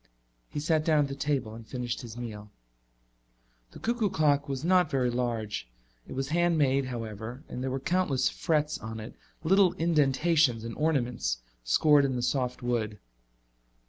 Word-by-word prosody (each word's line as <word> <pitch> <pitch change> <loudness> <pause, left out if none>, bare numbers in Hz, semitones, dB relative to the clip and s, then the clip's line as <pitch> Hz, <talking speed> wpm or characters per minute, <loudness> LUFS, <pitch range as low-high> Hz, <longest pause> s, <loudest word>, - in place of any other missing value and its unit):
He - - -4
sat 155 +1 +1
down 155 -2 +4
at 140 - -3
the 135 - -4
table 135 -6 -1
and 115 +1 -9
finished 120 +2 -4
his 120 -2 -9
meal. 105 -3 -7 1.2
The - - -13
cuckoo 230 -2 0
clock 145 -4 +2
was 135 +2 -3
not 180 -2 +4
very 130 -4 +1
large. 115 - -2 0.4
It - - -7
was 135 +1 -2
hand 170 +1 +2
made, 135 -2 +2
however, 115 +1 -6
and 125 - -6
there 130 - -1
were 135 +1 -2
countless 160 -3 +1
frets 155 -2 0
on 110 0 -6
it, 110 +2 -8 0.3
little 190 +2 +5
indentations 150 -5 +2
and 115 0 -5
ornaments 125 - 0 0.2
scored 145 - +5
in 135 -2 0
the 120 - -2
soft 125 -1 -1
wood. 110 -4 -1
135 Hz, 165 wpm, -29 LUFS, 120-155 Hz, 1.2 s, little